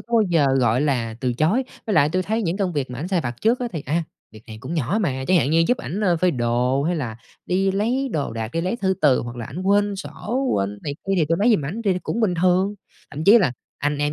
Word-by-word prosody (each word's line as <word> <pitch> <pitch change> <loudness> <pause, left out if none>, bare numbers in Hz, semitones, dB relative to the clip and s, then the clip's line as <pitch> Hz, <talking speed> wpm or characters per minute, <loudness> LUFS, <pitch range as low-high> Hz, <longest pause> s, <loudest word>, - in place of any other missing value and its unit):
có 235 - -15
bao 225 - +5
giờ, 165 -5 +3
gọi 120 0 +2
là, 125 -6 0
từ 125 -1 0
chối. 165 - +1 0.2
Với 215 - 0
lại 150 -3 +5
tui 185 +4 0
thấy 220 +4 -1
những 175 -2 -1
công 195 -3 -1
việc 140 -5 -2
mà 125 - -6
ảnh 165 +6 -4
sai 185 -3 +1
vặt 120 -4 -5
trước 235 +3 +2
á 245 - -1
thì, 160 -5 -4
a, 160 +5 0 0.3
việc 110 -1 -14
này 110 - -9
cũng 135 +7 -5
nhỏ 160 - 0
mà, 130 -9 -1
chẳng 185 - +5
hạn 145 -4 +2
như 165 +1 +4
giúp 250 - +2
ảnh 195 - -4 0.2
phơi 185 - +3
đồ 125 +1 0
hay 170 +4 0
là 120 -8 -4 0.3
đi 195 +2 +1
lấy 235 +8 0
đồ 145 -6 -2
đạc, 115 -1 -4
đi 165 - -1
lấy 185 +7 -1
thư 190 -5 0
từ, 140 -4 +4
hoặc 120 0 -7
là 120 - -5
ảnh 150 +7 -6
quên 200 +1 +2
sổ, 245 +6 -3
quên 100 0 0
tiền 105 - -10
này 145 - -4
kia 195 - 0
thì - - +4
tui 165 - +1
lấy 220 +5 +4
giùm 145 - -4
ảnh, 185 +11 -4
thì 195 - +3
thì 180 - -2
cũng 225 - -3
bình 205 -6 +2
thường. 185 +3 +2 0.4
Thậm 150 +2 -5
chí 210 +6 +8
là 175 - +1 0.3
anh 145 0 -1
em 145 0 0
165 Hz, 290 wpm, -22 LUFS, 135-195 Hz, 0.4 s, chí